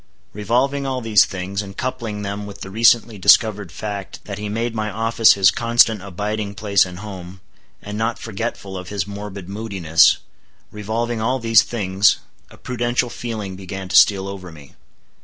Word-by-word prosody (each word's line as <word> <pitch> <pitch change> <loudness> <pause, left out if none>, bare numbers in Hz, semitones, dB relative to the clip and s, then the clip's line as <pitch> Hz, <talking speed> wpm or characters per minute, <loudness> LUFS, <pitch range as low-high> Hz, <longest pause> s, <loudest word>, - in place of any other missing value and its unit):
Revolving 130 +7 0
all 130 -1 -2
these 110 -4 +4
things, 95 +2 -4
and 100 -1 -10
coupling 120 -5 -4
them 100 +1 -5
with 100 - -11
the 95 - -7
recently 115 0 +3
discovered 100 -1 +4
fact 100 +2 -6
that 100 -1 -6
he 105 0 -4
made 115 +2 -2
my 110 -1 -2
office 115 +2 +4
his 95 -2 +4
constant 115 -3 +3
abiding 105 +2 -4
place 100 -2 +2
and 90 -1 -9
home, 95 -2 -9 0.4
and 105 +1 -6
not 115 +1 -1
forgetful 110 -3 -5
of 90 -1 -9
his 100 -4 -2
morbid 100 -2 -8
moodiness; 95 -6 +3 0.5
revolving 110 +2 -3
all 125 +4 +1
these 115 -4 +5
things, 100 -3 +2 0.3
a - - -16
prudential 120 0 -1
feeling 110 -5 -5
began 95 0 -7
to 90 - -2
steal 100 -2 +5
over 95 -3 -8
me. 75 -3 -15
105 Hz, 165 wpm, -20 LUFS, 95-115 Hz, 0.5 s, these